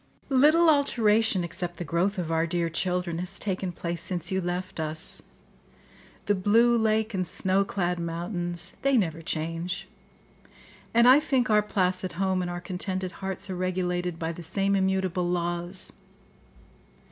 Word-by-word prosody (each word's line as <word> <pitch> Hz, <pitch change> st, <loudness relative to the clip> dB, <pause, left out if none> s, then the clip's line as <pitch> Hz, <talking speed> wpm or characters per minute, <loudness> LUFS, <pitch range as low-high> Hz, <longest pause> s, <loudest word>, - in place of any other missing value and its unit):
"Little 300 Hz, +6 st, +5 dB
alteration, 225 Hz, -, +3 dB
except 175 Hz, +1 st, -4 dB
the -, -, -4 dB
growth 175 Hz, +6 st, 0 dB
of 170 Hz, -3 st, -2 dB
our 165 Hz, +1 st, +1 dB
dear 170 Hz, -1 st, -1 dB
children, 180 Hz, 0 st, -1 dB
has 180 Hz, 0 st, -3 dB
taken 190 Hz, -2 st, -2 dB
place 170 Hz, -1 st, -4 dB
since 175 Hz, +1 st, -3 dB
you 190 Hz, 0 st, +1 dB
left 180 Hz, 0 st, -4 dB
us. 160 Hz, +3 st, -1 dB, 1.0 s
The 205 Hz, -, +3 dB
blue 225 Hz, +5 st, +4 dB
lake 220 Hz, -1 st, +1 dB
and 185 Hz, -2 st, -1 dB
snow 195 Hz, 0 st, +1 dB
clad 180 Hz, -3 st, -1 dB
mountains—they 175 Hz, +9 st, -1 dB
never 165 Hz, -6 st, 0 dB
change; 165 Hz, +1 st, -3 dB, 1.0 s
and 235 Hz, +1 st, +5 dB
I 260 Hz, +3 st, +8 dB
think 260 Hz, -6 st, +1 dB
our 210 Hz, 0 st, +5 dB
placid 185 Hz, -3 st, -1 dB
home 190 Hz, +1 st, 0 dB
and 175 Hz, -, -3 dB
our 175 Hz, 0 st, -4 dB
contented 185 Hz, 0 st, -3 dB
hearts 190 Hz, 0 st, -4 dB
are -, -, -3 dB
regulated 180 Hz, -1 st, -1 dB
by 165 Hz, 0 st, -2 dB
the 170 Hz, -, -8 dB
same 195 Hz, +4 st, 0 dB
immutable 190 Hz, -2 st, 0 dB
laws. 175 Hz, +1 st, -2 dB
185 Hz, 145 wpm, -27 LUFS, 175-200 Hz, 1.0 s, I